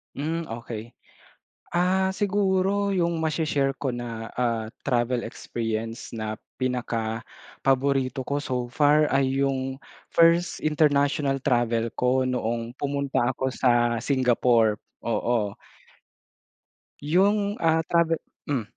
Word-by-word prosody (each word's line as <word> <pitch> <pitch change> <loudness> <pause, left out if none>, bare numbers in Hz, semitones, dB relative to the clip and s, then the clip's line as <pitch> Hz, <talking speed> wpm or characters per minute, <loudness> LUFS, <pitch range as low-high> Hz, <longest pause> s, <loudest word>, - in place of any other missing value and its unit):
Hmm, 160 +3 -2
okey. 115 -1 -7 0.8
Ah, 190 +2 +2
siguro 200 0 +1
yung 170 -2 +1
mashe-share 155 -3 0
ko 135 - 0
na, 115 -2 -5
ah, 115 -3 0 0.2
travel 120 -2 +1
experience 115 0 -4
na 110 -1 -4 0.2
pinakapaborito 130 +3 -1
ko 140 +2 -2
so 125 -4 -2
far 150 +3 +4
ay 135 0 +1
yung 135 0 -1 0.3
first 170 +1 +4
international 145 -2 +2
travel 120 -3 +1
ko 125 +1 +2
noong 120 -1 -2
pumunta 140 -3 0
ako 130 0 -1
sa 120 -2 +2
Singapore. 120 -3 +2 0.2
Oo. 115 -3 -1 1.5
Yung, 200 +6 +2
ah, 160 0 +2
travel 165 0 +2 0.3
hmm. 135 -6 0
135 Hz, 100 wpm, -25 LUFS, 120-155 Hz, 1.5 s, far